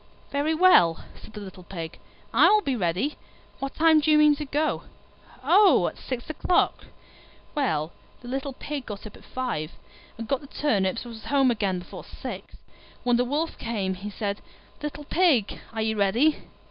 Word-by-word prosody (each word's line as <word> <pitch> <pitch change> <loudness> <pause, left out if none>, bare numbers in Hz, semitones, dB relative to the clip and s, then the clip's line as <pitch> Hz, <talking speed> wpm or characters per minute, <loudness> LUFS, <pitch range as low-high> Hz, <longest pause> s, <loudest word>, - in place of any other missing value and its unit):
"Very 290 +3 +1
well," 180 - +5 0.2
said 220 - -13
the 210 - -7
little 190 -2 -10
Pig, 170 -3 -7 0.3
"I - - +7
will 425 0 +4
be 270 - 0
ready. 195 - -1 0.4
What 275 0 -4
time 320 -1 +5
do 305 +1 0
you 305 - +6
mean 300 -1 +6
to 300 - -4
go?" 295 +3 -1 0.6
"Oh, 410 -1 +6
at - - -16
six 250 -2 -5
o'clock." 330 +3 +1 0.7
Well, 165 - 0 0.3
the 245 - -11
little 270 +2 -3
Pig 285 0 -6
got 205 -1 -7
up 215 - -10
at - - -16
five, 210 -12 -4 0.4
and 230 0 -6
got 275 +1 0
the 280 - -12
turnips 205 -10 0
and 240 - -8
was 220 - -11
home 275 -3 +3
again 200 -5 0
before 180 - -9
six. - - -8 0.5
When 245 -1 +3
the 245 - +2
Wolf 300 +6 -2
came 205 -5 -2
he 195 +3 -6
said, 205 0 -3 0.4
"Little 295 0 -5
Pig, 290 - +2
are 220 -1 -2
you 220 0 0
ready?" 235 +11 +2
250 Hz, 180 wpm, -26 LUFS, 200-295 Hz, 0.7 s, I